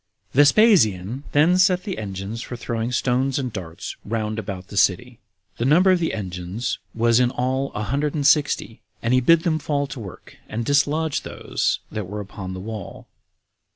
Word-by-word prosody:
9. 140 - +6
Vespasian 140 - +4
then 165 +5 +4
set 185 -1 +4
the 195 - -4
engines 100 +2 -5
for 125 - -6
throwing 120 0 -3
stones 125 +2 +1
and 130 -5 -3
darts 85 -4 -6
round 110 0 -2
about 95 -3 -6
the - - -9
city. 115 +4 +1 0.4
The 115 - -1
number 175 +8 +5
of 185 - +3
the 165 - -1
engines 95 +2 -4 0.2
was 115 +1 +3
in 125 -1 +3
all 130 +2 -1
a 105 - -3
hundred 140 +8 -1
and 145 -2 -1
sixty, 140 -6 +2 0.2
and 125 +2 +2
bid 165 +5 +5
them 160 -2 +1
fall 145 -1 -1
to 135 - -8
work, 100 -5 -11
and 115 +2 -3
dislodge 145 +3 +1
those - - -2
that 105 -4 -4
were 105 +2 -5
upon 95 -2 -7
the - - -6
wall. 105 -1 -7
120 Hz, 180 wpm, -23 LUFS, 105-145 Hz, 0.4 s, 9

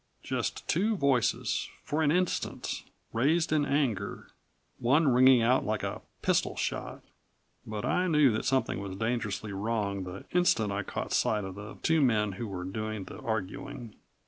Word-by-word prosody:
Just - - -3
two 210 +6 +1
voices 135 - +1
for 150 +2 -1
an 145 -2 +3
instant, 180 +2 -1 0.3
raised 155 +9 +2
in 150 -2 +3
anger, 120 -9 -1 0.5
one 140 +6 +3
ringing 130 -1 +6
out 125 +3 +3
like 110 0 -1
a - - -3 0.2
pistol - - +2
shot. - - -3 0.6
But 105 -1 -4
I 180 +1 +1
knew 150 -6 +5
that 110 - -2
something 130 -7 +1
was 100 -1 -5
dangerously 110 -1 -2
wrong 100 -1 -1
the 90 +2 -8
instant 145 - +3
I 100 +1 -1
caught - - -4
sight 105 -1 +2
of 95 -1 -5
the 105 +2 -9
two 160 -1 +3
men 110 -6 +3
who 105 +5 -5
were 95 -3 -5
doing 110 +2 -4
the - - -10
arguing. 110 +1 -4
115 Hz, 160 wpm, -29 LUFS, 100-140 Hz, 0.6 s, ringing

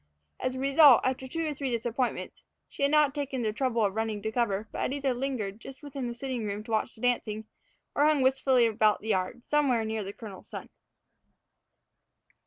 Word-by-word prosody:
As 255 0 -2
a - - -4
result, 275 -1 +7
after 260 0 -1
two 330 +5 -3
or 305 - -1
three 275 -1 -3
disappointments, 240 +1 -2 0.3
she - - -10
had 280 - +4
not 300 -2 +4
taken 275 -4 -3
the 215 -1 0
trouble 235 -2 +1
of 195 - -1
running 220 -1 -2
to 220 - -2
cover, 220 -3 -1
but - - -4
had - - -1
either 275 -2 0
lingered 240 -6 -3
just 270 +2 -11
within 275 -3 -5
the 240 - -5
sitting 255 -2 -4
room 205 0 -4
to 225 - -9
watch 220 -1 0
the 220 - -16
dancing, 220 -3 0 0.5
or 290 - +3
hung 300 -3 +3
wistfully 260 -2 +3
about 215 -1 +2
the 220 - -6
yard, 190 +4 -1
somewhere 270 -7 +2
near 220 -1 -2
the 195 - -6
colonel's 205 -3 -11
son. - - -8
245 Hz, 200 wpm, -28 LUFS, 220-270 Hz, 0.5 s, result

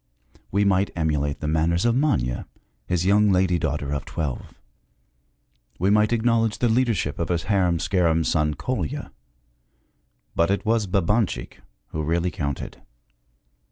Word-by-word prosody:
We 100 +1 +2
might 100 0 +2
emulate 75 -3 -1
the 75 - -2
manners 80 +5 +1
of 120 0 +3
Manya, 65 - 0 0.4
his 90 -1 0
young 105 +2 +4
lady 90 -1 +2
daughter 75 -2 -2
of 70 -2 -2
twelve; 75 -4 -4 1.3
we 95 +3 +1
might 105 +1 +3
acknowledge 115 -1 +1
the 120 - +1
leadership 110 - 0
of 85 - -2
his 85 -2 0
harum 90 -5 +2
scarum 85 -2 +1
son 75 -1 +1
Kolya; 130 +3 -3 1.2
but 85 +1 +2
it 100 +3 0
was 110 -2 +1
Babanchik 100 +3 0 0.3
who 80 - -3
really 85 +3 0
counted. 70 -3 -5
90 Hz, 135 wpm, -24 LUFS, 80-105 Hz, 1.3 s, young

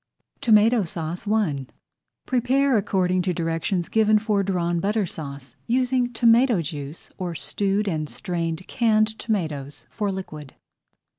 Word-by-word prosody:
TOMATO 225 +1 +5
SAUCE 170 +3 -5
I 155 - 0 0.6
Prepare 260 +2 +2
according 185 -3 +1
to 180 -1 -1
directions 165 +2 -1
given 215 -1 +3
for 210 -1 +1
Drawn 175 -3 0
Butter 210 +3 0
Sauce, 140 -5 -8
using 250 0 +1
tomato 235 -1 +4
juice 145 0 -7
or 175 -2 -3
stewed 200 +6 -1
and 155 -5 -2
strained 170 -3 -4
canned 220 -2 +1
tomatoes 155 - -3
for 210 -2 -2
liquid. 155 -7 -7
195 Hz, 125 wpm, -24 LUFS, 165-220 Hz, 0.6 s, TOMATO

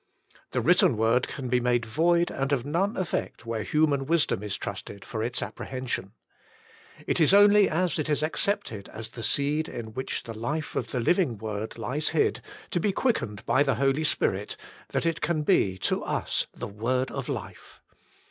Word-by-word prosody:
The - - -1
written - - +4
word 115 +3 +2
can 130 - -5
be 125 0 +2
made 120 -1 +1
void 170 +8 +2
and 135 +1 -2
of 135 -3 +1
none 180 +8 0
effect 175 -8 -3
where 115 -1 -2
human 145 0 +1
wisdom 160 - +2
is 105 -1 -3
trusted 100 -1 -6
for 110 - -4
its 120 +2 -1
apprehension. 130 -6 -4 0.9
It - - 0
is 165 +4 +6
only 205 0 +7
as 175 +1 0
it 155 - -2
is 150 0 +1
accepted 155 - -1
as 110 0 -7
the 115 - -9
seed 145 +6 +1
in 110 -2 -7
which 130 +3 -3
the 115 - -7
life 145 +8 -3
of - - -2
the 125 - -2
Living 135 - +2
Word 110 +1 -5
lies 130 +7 -1
hid, 160 - +1 0.3
to 175 - +1
be 200 +4 +1
quickened 110 - -1
by 135 - +3
the 140 -1 +3
Holy 135 +3 +1
Spirit, - - 0 0.3
that - - -1
it 165 -1 0
can 155 -3 0
be 100 - +3
to - - 0
us - - -1
the - - -6
word 125 +6 -1
of - - -5
life. - - -7
135 Hz, 185 wpm, -27 LUFS, 115-160 Hz, 0.9 s, only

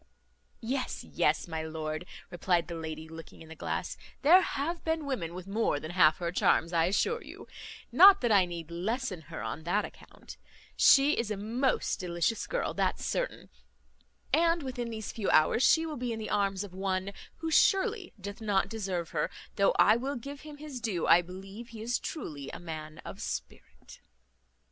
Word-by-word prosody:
"Yes, 255 +3 -3
yes, - - 0
my 160 -1 -3
lord," 155 +1 -5 0.2
replied 175 -1 +1
the 175 - -6
lady, 160 -1 -6
looking 160 0 -11
in 160 - -15
the 160 - -9
glass, - - -4 0.3
"there 350 +6 +8
have 330 +2 -3
been 320 -2 -1
women 180 -12 -3
with 180 -1 -7
more 200 -6 0
than 155 - -7
half 165 -4 +5
her 170 -2 -2
charms, 170 -1 +2
I 165 -1 +3
assure 455 - +1
you; - - -11 0.4
not 395 +1 +8
that 240 - +1
I 195 -3 +6
need 170 -2 -7
lessen 195 +2 -2
her - - -6
on 115 +7 -4
that 200 +5 +1
account: - - -13 0.4
she 280 +1 +6
is 230 -2 -1
a 210 - -2
most 235 +6 0
delicious 175 +4 -1
girl, - - -2
that's - - -1
certain; - - -3 0.8
and 335 -1 +3
within 250 -3 -4
these 220 -2 -5
few 215 -4 -2
hours 155 +9 +4
she 320 +4 +5
will 310 -2 -5
be 245 -1 -3
in 225 - -3
the 220 - -5
arms 200 -1 +1
of 200 -3 -10
one, 190 0 -2 0.3
who 325 0 -4
surely 390 +3 +3
doth 200 +3 -7
not 200 -3 +1
deserve 190 -6 -3
her, - - 0 0.3
though 200 - +3
I 215 +2 +6
will 270 +4 -3
give 275 +4 -8
him 300 -1 -10
his 290 -4 -8
due, 200 -8 -1
I 175 - +6
believe 195 +6 -10
he 230 -2 -10
is 240 +2 0
truly 145 - -6
a - - -7
man 155 -2 -7
of - - -8
spirit." 65 0 -7
200 Hz, 185 wpm, -30 LUFS, 170-265 Hz, 0.8 s, there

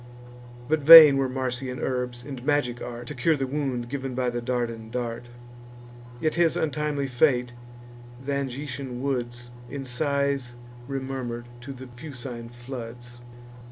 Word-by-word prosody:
But 155 +1 +2
vain 155 -1 +11
were 135 -1 +1
Marsian 130 0 -3
herbs, 125 -1 -3
and 135 -2 -8
magic 140 -4 0
art, 120 0 -6
To 150 - -6
cure 150 +4 +2
the 135 - -1
wound 130 -3 -2
giv'n 135 0 -4
by 125 -1 0
the 120 0 -3
Dardan 120 -2 -3
dart: 120 0 -4 0.9
Yet 155 +3 0
his 170 -2 +2
untimely 150 -2 -1
fate 125 -2 +2 0.7
th' - - -6
Angitian 135 -2 -4
woods 120 -3 -3 0.2
In 140 -1 -6
sighs 140 -1 -1 0.3
remurmur'd 130 -3 -4 0.2
to 135 +3 -8
the 130 -1 -9
Fucine 125 -2 -8
floods. 120 -1 -9
130 Hz, 135 wpm, -26 LUFS, 120-140 Hz, 0.9 s, vain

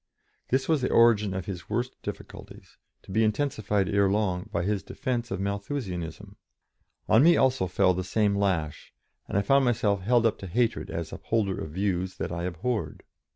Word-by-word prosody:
This 130 +1 +1
was 155 -4 +2
the 130 - 0
origin 110 -3 +4
of 95 -2 -4
his 90 -3 -7
worst 120 +4 -1
difficulties, - - -9 0.3
to - - -12
be 110 +3 +2
intensified, 105 -4 0
ere 100 -1 +2
long, 100 -1 -1
by 85 - -1
his 100 +1 0
defence 120 -2 -3
of 95 - -3
Malthusianism. 100 - -4 0.7
On 110 - +5
me 170 +2 +6
also 130 -8 +2
fell 90 +1 +3
the 90 +1 -2
same 100 +2 +1
lash, 90 -7 -2 0.3
and - - -2
I 100 - +2
found 135 +6 +4
myself 105 -5 +1
held 120 +4 +3
up 115 - +1
to 95 - -7
hatred 115 +3 0
as 85 -1 -5
upholder 105 -4 -1
of 80 - -6
views 95 -1 -1
that - - -3
I 85 0 -3
abhorred. 90 - -3
100 Hz, 180 wpm, -27 LUFS, 95-115 Hz, 0.7 s, me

